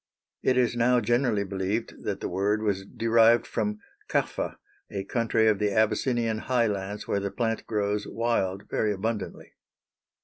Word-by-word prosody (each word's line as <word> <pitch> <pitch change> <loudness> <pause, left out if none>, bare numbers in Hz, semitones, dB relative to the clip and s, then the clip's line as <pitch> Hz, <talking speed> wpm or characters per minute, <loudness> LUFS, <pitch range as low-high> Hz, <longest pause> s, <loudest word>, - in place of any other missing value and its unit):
It 130 - +2
is 120 -2 +2
now 120 +1 +4
generally 120 -2 +1
believed 100 +3 -3
that - - -2
the - - -2
word 100 +4 0
was 100 -2 -1
derived 115 +1 +4
from 105 -2 -2 0.3
Kaffa, - - -1 0.3
a 100 -1 -4
country 110 +1 +1
of 105 -2 +3
the 105 -1 +2
Abyssinian 110 +2 +1
highlands 105 -5 -1
where 100 - +1
the 100 0 -2
plant 115 +2 -2
grows 105 -1 -1
wild 100 -5 -1
very 105 -1 0
abundantly. 105 0 -4
110 Hz, 145 wpm, -27 LUFS, 100-115 Hz, 0.3 s, now